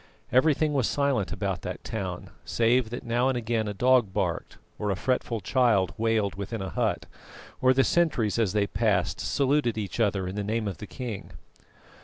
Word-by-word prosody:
Everything 150 +3 +3
was 135 -5 +2
silent 140 -9 0
about 95 -2 -2
that - - -6
town, 95 -5 -5
save 120 0 +2
that 120 - -6
now 120 +2 +2
and 130 - 0
again 115 -2 -1
a - - -2
dog 125 -1 +3
barked - - -2 0.2
or 105 - -1
a 100 - +1
fretful 120 +2 -1
child 105 - +2
wailed 110 -2 +1
within 100 +3 -5
a 95 -1 -4
hut, - - -1 0.6
or 130 0 +5
the 135 +1 +4
sentries 130 -12 +1
as 105 -5 +1
they 105 -1 +2
passed 105 0 0
saluted 140 -4 +1
each 105 0 -4
other 100 -4 +1
in 90 - -4
the 105 0 -3
name 110 +1 -1
of 100 - -5
the 105 - -7
king. 120 -6 -6
110 Hz, 185 wpm, -27 LUFS, 100-125 Hz, 0.6 s, or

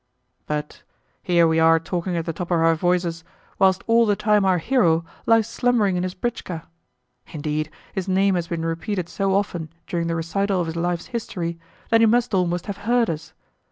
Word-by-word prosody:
But 150 0 -4 0.4
here 175 -3 +3
are - - +4
we 160 0 +2 0.2
talking 175 +1 -2
at 165 - -2
the 165 - -3
top 175 +2 -5
of 175 - +2
our 165 0 +4
voices 170 0 0 0.4
whilst 190 -1 +3
all 230 0 +4
the 205 - +3
time 210 0 +2
our 185 -1 +3
hero 170 -5 +2 0.2
lies 225 -1 +4
slumbering 230 -5 +1
in 180 - 0
his 185 0 -3
britchka! 185 -7 -4 0.6
Indeed, 155 0 -3 0.2
his 190 -1 -3
name 195 +1 +3
has 175 -2 -1
been 165 -1 -3
repeated 170 +2 -2
so 195 +1 0
often 175 -5 -1 0.2
during 170 -1 -2
the 165 - -1
recital 190 +4 -1
of 175 - 0
his 160 0 -5
life's 175 0 -1
history 170 -7 -4 0.3
that 225 0 +4
he 225 - +6
must 240 +1 +2
almost 180 -2 0
have 200 -2 -5
heard 230 +1 +1
us! 160 0 -7
180 Hz, 190 wpm, -23 LUFS, 165-205 Hz, 0.6 s, he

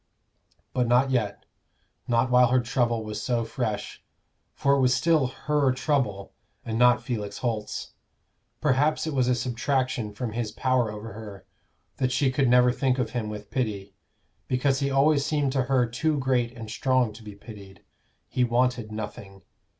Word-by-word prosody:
But 125 -2 +1
not 125 +3 +3
yet 110 -6 -1 0.6
not 120 +1 +2
while 125 0 +6
her 130 +2 +3
trouble 120 -1 0
was 105 -1 -5
so 120 -1 0
fresh. 115 -2 -4 0.5
For 140 - +2
it 140 - +3
was 130 -1 +3
still 155 -2 +3
her 145 +1 0
trouble, 130 -8 -1 0.3
and 115 0 -2
not 125 0 +5
Felix 105 -5 -4
Holt's. 110 -4 -3 0.7
Perhaps 150 +2 +2
it 160 - -3
was 130 -2 +2
a 125 - +3
subtraction 125 -1 -1
from 110 +2 -4
his 115 -1 -3
power 125 -1 +1
over 105 0 -8
her, 105 -2 -10 0.5
that 130 -1 0
she 130 +1 +2
could 130 -1 +2
never 125 0 +5
think 130 0 0
of 120 -4 -1
him 115 -4 -3
with 105 -1 -8
pity, 105 -6 -3 0.5
because 135 +1 +1
he 140 - 0
always 140 +1 +3
seemed 145 -2 0
to 130 -2 0
her 130 -1 +2
too 150 +6 -1
great 125 -2 0
and 110 -2 -7
strong 130 -1 +1
to - - -13
be 105 -2 -10
pitied; 100 -3 -13 0.4
he 125 - 0
wanted 120 -2 +1
nothing. 105 -2 -7
125 Hz, 165 wpm, -26 LUFS, 110-130 Hz, 0.7 s, while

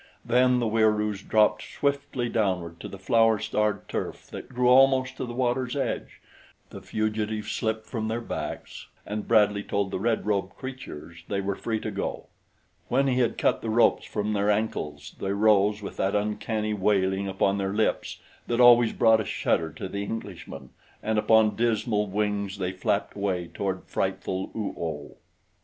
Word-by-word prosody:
Then 125 +1 +4
the 120 - 0
Wieroos 105 -2 +1
dropped 105 0 +3
swiftly 140 -3 -2
downward 90 -7 -1
to - - -7
the 100 - -9
flower 115 +3 +3
starred 105 -1 -1
turf - - -4
that - - -8
grew 125 -1 0
almost 130 0 +5
to - - -3
the 120 - -6
water's 125 0 0
edge, 140 - -3 0.5
the - - -9
fugitives 110 0 -2
slipped 110 0 -2
from 110 -3 -3
their 115 +1 -1
backs, 120 - -6 0.2
and 105 0 -4
Bradley 105 -3 +4
told 100 -1 -2
the - - -2
red 115 +2 0
robed 100 -2 -1
creatures 85 - -8
they 100 - -1
were 100 0 -1
free 110 +1 -2
to - - -4
go. - - -4 0.6
When 135 +3 +2
he 130 -2 +1
had 120 -3 +1
cut - - +1
the 115 - -3
ropes 115 +2 +3
from 105 +1 -2
their 100 0 +1
ankles 75 -9 -2
they 95 0 -1
rose 105 0 +3
with - - -7
that 95 +1 0
uncanny 105 +1 -1
wailing 95 -1 +1
upon 95 +1 +1
their 95 0 -1
lips 110 - 0 0.3
that 120 0 0
always 120 -2 +7
brought 110 -1 +4
a - - -2
shudder 80 -5 0
to 80 - -6
the 100 +2 -4
Englishman, 100 -3 -7 0.3
and 110 0 +1
upon 110 -1 +4
dismal 110 -2 +1
wings 100 0 -1
they 95 -2 -2
flapped 95 - -1
away 95 -4 -2
toward 95 -2 -3
frightful 95 0 -2
Oo 110 -2 -3
oh. 75 -3 -5
105 Hz, 170 wpm, -26 LUFS, 100-115 Hz, 0.6 s, always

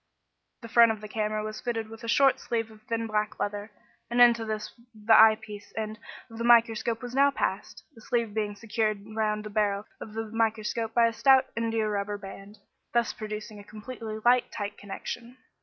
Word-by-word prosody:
The - - -6
front 230 0 +6
of 220 - -4
the 215 - -8
camera 215 0 -2
was 215 0 -6
fitted 225 -2 -3
with 225 +1 -12
a - - -5
short 270 +3 +4
sleeve 230 -2 -3
of 215 -1 -16
thin 230 0 -1
black 215 -1 -2
leather, 205 +1 -3 0.4
and 240 +1 0
into 235 -1 +6
this 215 -1 -4 0.2
the 215 +1 +2
eye 220 0 +8
piece 210 -2 -10
end 215 0 -4 0.3
of 225 -2 -11
the - - -2
microscope 230 0 +3
was 245 0 -6
now 280 +1 +5
passed, 280 - -3
the 225 - -16
sleeve 235 -3 -1
being 210 -1 -2
secured 215 -1 -2
round 215 -1 0
the 210 - -8
barrel 205 -1 0
of 215 - -9
the 225 0 -2
microscope 225 0 -1
by 235 -1 +5
a 230 - +1
stout 265 +2 +5
indiarubber 215 -3 -1
band, 200 +1 -11 0.4
thus 235 -2 +2
producing 215 -1 -7
a - - -11
completely 215 +1 -7
light 245 0 +4
tight 205 -2 -5
connection. 235 +5 -7
220 Hz, 190 wpm, -27 LUFS, 210-230 Hz, 0.4 s, eye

